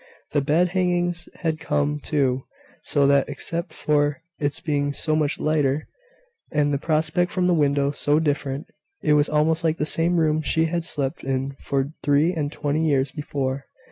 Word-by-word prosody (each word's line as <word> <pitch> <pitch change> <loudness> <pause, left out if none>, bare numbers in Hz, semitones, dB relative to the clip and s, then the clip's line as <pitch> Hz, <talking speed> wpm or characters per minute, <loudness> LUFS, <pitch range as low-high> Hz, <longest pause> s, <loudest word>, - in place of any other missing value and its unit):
The 145 - +2
bed 160 +6 +2
hangings 175 -2 0
had 160 -2 -1
come, 150 -1 0
too; 135 -4 0 0.4
so 145 -2 +2
that, 140 0 +3
except 170 +5 -2
for 150 +1 0 0.2
its 145 +1 -1
being 145 -3 -1
so 155 +2 +1
much 150 -2 0
lighter, 150 -1 +1 0.6
and 145 -1 +1
the 140 - 0
prospect 160 +3 +1
from 185 -1 0
the 180 - +3
window 140 -3 +2
so 145 +1 +1
different, 145 -1 -1 0.4
it 150 - +3
was 150 0 +3
almost 155 +2 +2
like 160 0 +1
the 150 - 0
same 170 +3 +2
room 155 -1 +2
she 160 +1 +1
had 170 +1 -1
slept 140 -5 -2
in 135 +1 -2
for 140 +2 -2
three 145 +4 +3
and 150 -4 -2
twenty 150 +1 -1
years 140 -3 +2
before. 140 -2 -3
150 Hz, 175 wpm, -23 LUFS, 140-160 Hz, 0.6 s, that